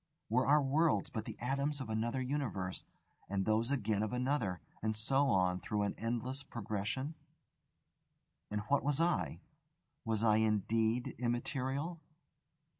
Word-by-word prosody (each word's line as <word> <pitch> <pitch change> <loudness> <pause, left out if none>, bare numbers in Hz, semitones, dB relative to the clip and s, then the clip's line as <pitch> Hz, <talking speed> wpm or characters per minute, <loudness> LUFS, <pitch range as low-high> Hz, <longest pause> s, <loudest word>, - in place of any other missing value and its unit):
Were 125 +4 +3
our 145 +1 +6
worlds 150 +1 +2
but 110 -4 -3
the - - -7
atoms 140 +3 -1
of 130 - -4
another 115 +4 -1
universe, 125 -9 -2 0.4
and 95 -1 0
those 110 +2 +2
again 110 -7 +1
of 110 +2 -1
another, 125 -8 0 0.2
and 110 0 0
so 135 +6 +3
on 90 -5 +3
through 105 0 -1
an 100 - 0
endless 120 +4 -2
progression? 115 +3 -3 1.4
And 105 0 -1
what 135 +7 +2
was 145 +1 +1
I? 170 +1 +1 0.6
Was 110 -2 0
I 110 -2 +5
indeed 110 +2 +1
immaterial? 135 +6 -1
120 Hz, 135 wpm, -35 LUFS, 110-140 Hz, 1.4 s, our